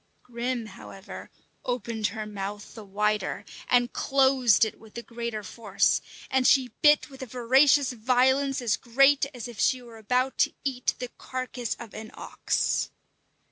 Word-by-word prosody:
Grim, 240 0 -3
however, 195 -1 -10 0.3
opened 230 -3 -2
her 215 0 -5
mouth 205 0 -6
the 220 - -10
wider, 210 +1 -1 0.2
and 245 0 +3
closed 265 -5 +3
it 220 - -7
with 220 -1 -17
the 235 - -6
greater 235 -2 -5
force, 195 -2 0 0.3
and 260 -1 +3
she 260 -3 +4
bit 295 -1 +4
with 270 - -12
a 260 - -6
voracious 260 +4 +4
violence 260 +3 +2
as 225 -3 +1
great 275 +3 +3
as 245 -5 -7
if 235 -5 -11
she 260 - +2
were 235 -2 -13
about 250 +5 0
to - - +3
eat 255 -3 -1
the 250 -1 -5
carcass 255 -2 -4
of 235 -3 -10
an 220 0 -8
ox. - - -1
240 Hz, 155 wpm, -27 LUFS, 220-260 Hz, 0.3 s, she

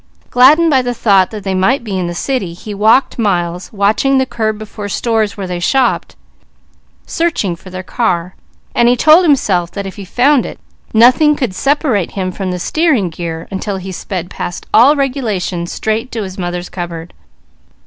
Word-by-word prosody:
Gladdened 300 +7 +5
by 265 -2 +4
the 245 -1 -3
thought 195 -5 +3
that 210 -2 -8
they 195 -1 -2
might 195 +9 +1
be 200 -4 -3
in 180 - -2
the 175 - -5
city, 195 -6 -2
he 210 +4 -8
walked 220 +6 +2
miles, 180 -4 -1
watching 215 +7 +2
the 265 - +2
curb 220 -4 -2
before 210 -1 -7
stores 220 -1 -1
where 195 - -4
they 180 -1 -4
shopped, 245 +8 0 0.9
searching 315 - -1
for 185 - -14
their 185 0 -7
car, 180 -4 -1 0.4
and 235 0 +3
he 245 - +4
told 315 +7 +6
himself 200 - +2
that 200 +1 -6
if 195 - -8
he 200 - -7
found 255 +7 +2
it, - - -8 0.3
nothing 255 +7 +5
could 255 -9 -2
separate 270 - 0
him 185 -2 -2
from 190 0 -4
the 180 - -2
steering 255 - +1
gear 165 -1 -6
until 195 +1 -3
he 190 0 -7
sped 180 -1 -5
past 175 - -6
all 260 +7 +6
regulation 220 - -2
straight 220 +6 -2
to 225 -2 -2
his 190 -1 -7
mother's 175 -1 -4
cupboard. 175 -2 -7
205 Hz, 180 wpm, -15 LUFS, 180-250 Hz, 0.9 s, told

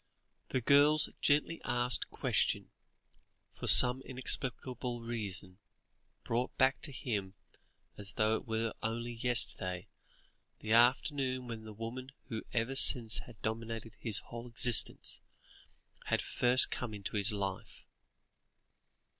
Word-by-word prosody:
The 130 - -2
girl's 145 +4 +3
gently 150 +3 0
asked 120 0 -2
question, - - -2 0.8
for - - -6
some 125 +1 +9
inexplicable 125 -1 -3
reason, 100 -5 -6 0.6
brought 120 +2 -4
back 130 +1 +1
to 150 - 0
him, 105 -7 -5 0.6
as 100 -1 -7
though 110 0 0
it - - -13
were 110 0 -3
only 115 +2 -5
yesterday, 115 -7 0 0.7
the 110 0 -4
afternoon 130 +2 +1
when 115 -2 -9
the 110 - -10
woman 125 +5 -9 0.2
who 110 -3 -5
ever 120 +2 -2
since 120 -5 +7
had 120 -4 -16
dominated 115 0 -6
his 110 -3 0
whole 120 +2 -8
existence, 120 0 0 0.8
had - - -1
first 125 +1 +2
come 115 -4 -6
into 100 +1 -7
his 105 +1 +4
life. 100 -2 -7
115 Hz, 120 wpm, -31 LUFS, 110-125 Hz, 0.8 s, some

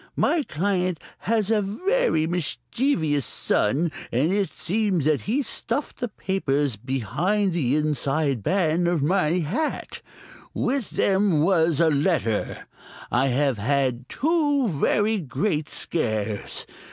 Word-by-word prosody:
My 335 - +2
client 185 - -1 0.2
has 220 -1 0
a 215 -2 +3
very 275 - +1
mischievous 160 - -1
son, 150 +11 0 0.2
and 145 +10 +1
it 200 -1 +1
seems 195 -5 -1
that 155 -2 +2
he 275 +6 +1
stuffed 285 +2 -4
the 245 - -1
papers 145 - -1
behind 135 - -1
the 140 -6 +1
inside 150 -3 0
band 175 - +1
of 170 -5 +1
my 165 0 +2
hat. 180 - -2 0.5
With 260 -3 -1
them 200 +1 +2
there 160 -5 +2
was 165 -3 +3
a 165 -1 +5
letter. 140 - 0 0.5
I 125 +3 +2
have 135 -2 +1
had 130 +1 0
two 290 -5 +1
very 205 +7 +1
great 155 - -2
scares. 110 -9 -2
165 Hz, 125 wpm, -24 LUFS, 140-205 Hz, 0.5 s, a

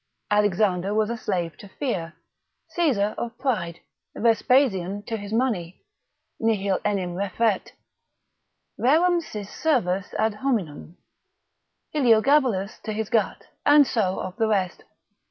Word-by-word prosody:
Alexander 205 -1 +2
was 215 +1 +1
a - - -2
slave 175 -8 -2
to 200 - -12
fear, 185 - -3 0.6
Caesar 235 -12 +1
of 235 0 -5
pride, 215 -11 -2 0.3
Vespasian 220 -4 +2
to 225 - -4
his 205 -1 -7
money 220 -8 -1 0.6
(nihil 200 -4 +1
enim 190 -4 -1
refert, 200 +2 -1 1.1
rerum 340 +7 +3
sis 210 -10 -8
servus 200 - 0
an 220 0 +1
hominum), 200 - -3 1.0
Heliogabalus 245 -5 +3
to 215 - -4
his 220 0 -4
gut, 225 - 0 0.2
and 290 0 +6
so 200 -7 0
of 185 0 -5
the 225 - +2
rest. 190 -4 -1
210 Hz, 120 wpm, -24 LUFS, 190-245 Hz, 1.1 s, and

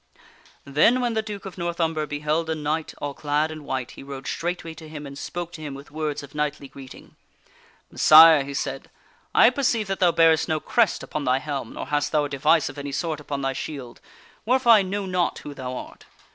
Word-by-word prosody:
Then 150 - +3
when 240 -2 0
the 220 - 0
Duke 210 -2 -8
of 195 -1 -8
North 170 0 -3
Umber 160 -2 0
beheld 150 +3 -1
a 160 - 0
knight 155 +1 -3
all 145 -1 -4
clad 150 +2 -1
in 155 -1 -8
white, 130 -3 -4
he - - -11
rode 135 -1 -8
straightway 170 0 -3
to 160 0 -12
him 150 -1 -8
and 140 0 -9
spoke 175 +4 -5
to 160 - -10
him 145 -3 -6
with 140 +2 -12
words 150 -1 -3
of 140 0 -12
knightly 150 -2 -2
greeting. 135 -1 -13 0.4
" - - -31
Messire," 155 -1 +8
he 140 0 -7
said, 135 0 -4 0.2
" - - -34
I - - +6
perceive 240 -6 0
that 195 - -2
thou 180 -2 +4
bearest 165 -1 +4
no 155 -1 +1
crest 230 +5 +1
upon 150 - -4
thy 125 +1 +3
helm, 140 -4 -5
nor - - -5
hast 145 0 -1
thou 150 -2 +2
a - - -5
device 140 +3 +2
of 145 - -7
any 140 0 -5
sort 160 +1 -2
upon 140 -1 -5
thy 135 0 0
shield, 130 -3 -7 0.4
wherefore 250 +1 +3
I 215 -3 +8
know 195 +1 -3
not 180 -2 0
who 145 - -8
thou 130 -2 -6
art. - - -10
155 Hz, 225 wpm, -24 LUFS, 140-170 Hz, 0.4 s, Messire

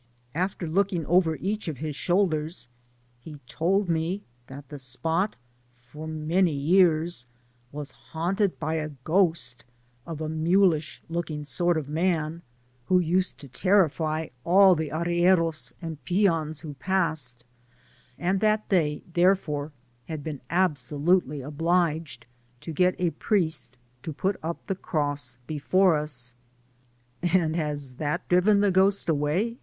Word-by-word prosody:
After 185 +2 -2
looking 180 0 0
over 170 -1 +3
each 205 +8 -3
of 155 -4 -3
his 150 0 -4
shoulders, 170 -4 0 0.5
he 150 +3 -11
told 185 +9 +1
me 170 +4 -1 0.2
that 140 +1 -10
the 145 -2 -8
spot 160 +10 -1 0.5
for 150 +6 -9
many 160 +3 +1
years 160 -2 +2 0.4
was 145 0 -6
haunted 180 +4 -2
by 160 +1 -2
the 155 -1 -4
ghost 165 -8 +1 0.4
of 165 -3 -5
a 155 - -3
mulish 160 0 +2
looking 165 -3 -4
sort 175 +2 +1
of 150 -3 -3
man 165 0 0 0.5
who 185 - +4
used 180 +1 +1
to 140 - -9
terrify 160 -1 +1
all 190 +3 +6
the 160 -3 -2
arrieros 170 0 +1
and 160 -4 -6
peons 165 -4 +1
who 150 -2 -7
passed, 150 -6 -1 0.7
and 185 +2 0
that 215 +1 +1
they, 155 -6 +1
therefore, 170 -5 +2 0.4
had 155 -3 -5
been 150 -3 -5
absolutely 150 -2 +1
obliged 160 -2 0 0.4
to 165 - -6
get 180 +4 +3
a 175 -2 +1
priest 160 - -1 0.2
to 160 - -5
put 190 +7 0
up 165 +2 -5
the - - -1
cross 145 -8 -2
before 165 +5 +3
us. 130 -5 -1 0.9
And 175 -2 +2
has 145 -5 -3
that 150 -1 -2
driven 200 +3 +4
the 205 -1 +3
ghost 190 +2 +3
away? 165 +10 0
165 Hz, 130 wpm, -26 LUFS, 150-185 Hz, 0.9 s, all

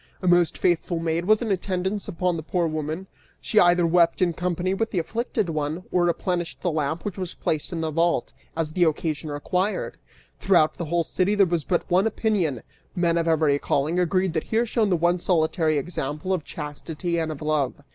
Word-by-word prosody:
A 185 - -3
most 175 -1 +4
faithful 175 -1 +1
maid 165 +1 -1
was 215 +3 +3
in 220 - -2
attendance 190 +1 -2
upon 180 -2 -1
the 160 - -3
poor 170 +2 -1
woman; 155 +3 -3 0.3
she 215 - +2
either 175 -2 +5
wept 170 0 +3
in 180 -2 +2
company 180 +2 -1
with 225 +3 -1
the 195 - -4
afflicted 220 +3 -1
one 155 +2 -2
or 180 -1 +3
replenished 175 0 -1
the 175 - 0
lamp 155 +1 -2
which 200 -2 -4
was 185 -2 -5
placed 155 -2 -2
in 170 -2 -3
the 160 -1 -1
vault, 170 +2 +1 0.2
as 160 -2 -1
the 175 +2 +2
occasion 155 -1 -1
required. 180 +7 -2 0.4
Throughout 175 -5 +3
the 170 - -3
whole 170 +2 +1
city 190 +5 0
there 200 -1 +5
was 170 -3 -1
but 175 - 0
one 190 +4 +3
opinion, 195 - 0 0.3
men 170 -1 +2
of 170 0 0
every 155 -3 +3
calling 155 +7 0
agreed 185 0 +1
that 160 - -1
here 225 +2 +1
shone 220 -2 +1
the 180 - +2
one 175 +2 +2
solitary 160 -2 +1
example 150 +3 -3
of 180 -5 -1
chastity 160 +4 -4
and 160 -1 -1
of 150 - -7
love! 150 -4 0
170 Hz, 200 wpm, -24 LUFS, 160-185 Hz, 0.4 s, either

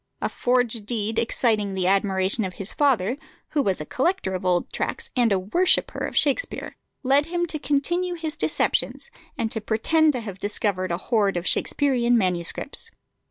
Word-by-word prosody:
A - - -1
forged 245 -4 0
deed 220 -1 0
exciting 220 -4 0
the 185 -1 -1
admiration 195 +2 +2
of 185 -2 -4
his 195 +1 -4
father, 260 -5 +2 0.3
who 295 - +1
was 195 -7 0
a 150 - -5
collector 265 - -1
of 185 - -4
old 180 -1 0
tracts - - -3
and 240 -3 +3
a 195 - +3
worshipper 340 - +1
of - - -6
Shakspere, - - 0 0.3
led 275 +3 +3
him 345 +1 -1
to 310 -2 -4
continue 345 +6 0
his 320 -2 -4
deceptions, - - 0 0.3
and 225 - -1
to 220 - -2
pretend 300 +9 +2
to 250 - -2
have 200 -4 -8
discovered 200 -3 -1
a 170 - 0
hoard 200 -2 +1
of 175 - -3
Shaksperian 245 -3 +2
MSS. 180 -5 -1
225 Hz, 170 wpm, -24 LUFS, 195-280 Hz, 0.3 s, and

